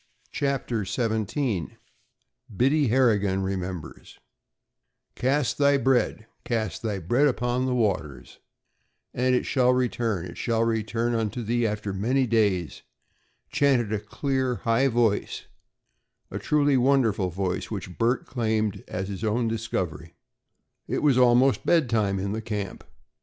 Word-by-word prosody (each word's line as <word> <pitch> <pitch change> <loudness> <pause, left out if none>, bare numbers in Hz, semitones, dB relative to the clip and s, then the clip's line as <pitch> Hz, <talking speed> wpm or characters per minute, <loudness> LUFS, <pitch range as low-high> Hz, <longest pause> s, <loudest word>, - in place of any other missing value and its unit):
CHAPTER 135 -6 -1
XVII 110 - -2 0.8
BIDDY 140 +3 +3
HARRIGAN 105 -6 +2
REMEMBERS 95 -3 -5 1.0
"Cast 135 +2 0
thy 140 0 +4
bread 130 -4 +1 0.2
cast 115 -3 -2
thy 110 -3 -2
bread 120 - +2
upon 125 -1 0
the 125 - 0
waters, 80 - -2 0.7
"And 125 +1 +2
it - - 0
shall 125 -2 +3
return 115 -7 -1
it 85 - -9
shall 115 -1 +1
return 115 +1 -1
unto 115 +1 -2
thee 120 +1 +1
after 105 -1 -3
many 125 +7 +1
days," 105 -8 0 0.7
chanted 125 -7 +2
a 105 - 0
clear, 130 +4 -2
high 115 +4 +3
voice, 115 -4 0 1.0
truly 145 -1 +2
a 130 - +3
wonderful 120 -8 +2
voice, 90 +1 -3
which 95 -4 -7
Bert 120 +3 +1
claimed 110 -5 -1
as 95 +1 -4
his 100 +1 -6
own 115 +2 0
discovery. 95 -8 -3 0.7
It - - -2
was 140 -4 +4
almost 125 +2 +4
bed 160 -8 +2
time 105 -4 +1
in 100 +1 -2
the 110 +2 -3
camp. 105 -4 -5
115 Hz, 130 wpm, -25 LUFS, 100-125 Hz, 1.0 s, thy